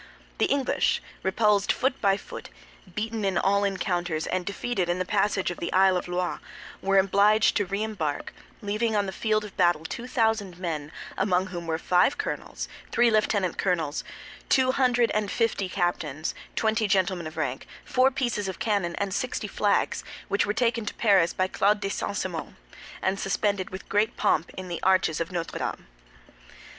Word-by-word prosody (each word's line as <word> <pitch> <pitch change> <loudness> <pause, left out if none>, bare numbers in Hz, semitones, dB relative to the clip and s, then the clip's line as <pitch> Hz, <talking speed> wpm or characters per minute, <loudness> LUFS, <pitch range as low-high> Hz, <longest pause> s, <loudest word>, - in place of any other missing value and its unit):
The - - +3
English, 275 -2 +1 0.2
repulsed 205 +1 +2
foot 265 +1 0
by 195 -1 +3
foot, - - -9 0.5
beaten 220 0 -2
in 195 -1 +1
all 200 +1 +2
encounters, 175 -5 -1
and 185 0 -2
defeated 200 -3 -1
in 175 - +1
the 185 - -1
passage 200 -2 +1
of 175 - -7
the - - -3
Isle 190 0 +5
of 180 - -2
Loie, 180 0 -2 0.4
were 195 0 +2
obliged 200 +3 +4
to 205 - 0
re 200 +3 -1
embark, 165 -10 -3 0.3
leaving 215 +2 0
on 205 -1 +2
the 190 - -3
field 215 +2 0
of 205 - -11
battle 175 -4 +3
two 235 +9 -5
thousand 220 -7 0
men, 160 -5 -4 0.3
among 185 -1 +2
whom 170 -1 -5
were 160 -1 0
five 180 - +3
colonels, - - -4 0.2
three 240 -1 +4
lieutenant 205 -4 +1
colonels, 165 -6 0 0.5
two 260 -1 +4
hundred 245 -3 +2
and 210 -1 0
fifty 225 -5 0
captains, 165 -5 -1 0.2
twenty 220 0 +1
gentlemen 185 -4 +1
of 155 - -10
rank, - - -2 0.2
four 260 +1 +4
pieces 240 -6 -1
of 190 - -4
cannon, 200 -6 0
and 200 -2 -2
sixty 250 +5 -2
flags, - - +1 0.3
which 200 - +1
were - - +2
taken 230 0 +1
to 210 - -5
Paris 195 -6 +4
by 185 - 0
Claude 205 +2 +2
de 200 -1 -2
St. 200 0 -3
Simon, 175 -5 -4 0.5
and 190 +1 0
suspended 195 -1 0
with 190 - -8
great 210 +2 +1
pomp 160 - +2
in 185 0 -5
the 175 -1 -4
arches 185 -4 +2
of 165 - -3
Notre 170 -2 -3
Dame. - - -4
195 Hz, 175 wpm, -26 LUFS, 180-215 Hz, 0.5 s, Isle